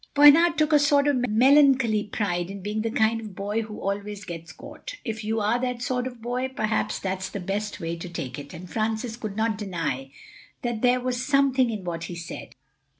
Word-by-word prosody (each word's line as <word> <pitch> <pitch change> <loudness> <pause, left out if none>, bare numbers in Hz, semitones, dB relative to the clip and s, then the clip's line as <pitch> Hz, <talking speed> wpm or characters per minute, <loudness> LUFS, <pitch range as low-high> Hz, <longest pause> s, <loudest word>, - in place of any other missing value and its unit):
Bernard 320 +4 +7
took 310 0 +2
a 295 - +7
sort 285 0 +4
of 250 -4 +1
melancholy 255 -2 +5
pride 180 -4 -2
in 195 -1 -7
being 210 +2 -2
the 225 - -1
kind 225 0 +2
of 210 -4 -9
boy 205 +3 -1
who 215 -1 -7
always 200 0 -4
gets 165 -1 -7
caught. - - -9
If 220 -2 -4
you 220 +1 0
are 215 +3 +1
that 250 -1 -2
sort 250 0 -1
of 245 -3 -10
boy, 250 +2 -1
perhaps 220 -5 -1
that's 190 0 -3
the 200 - -5
best 205 +3 -3
way 165 -1 -3
to 170 +1 -7
take 135 -5 -5
it. 145 0 -9
And 180 +2 -9
Francis 220 +3 -2
could 215 -4 -6
not 220 -1 0
deny 165 - -3 0.5
that 240 -3 -2
there 250 0 +4
was 250 0 -1
something 275 -3 +3
in 215 -4 -4
what 165 -2 -4
he 175 - -6
said. 170 -1 -8
220 Hz, 210 wpm, -25 LUFS, 195-250 Hz, 0.5 s, Bernard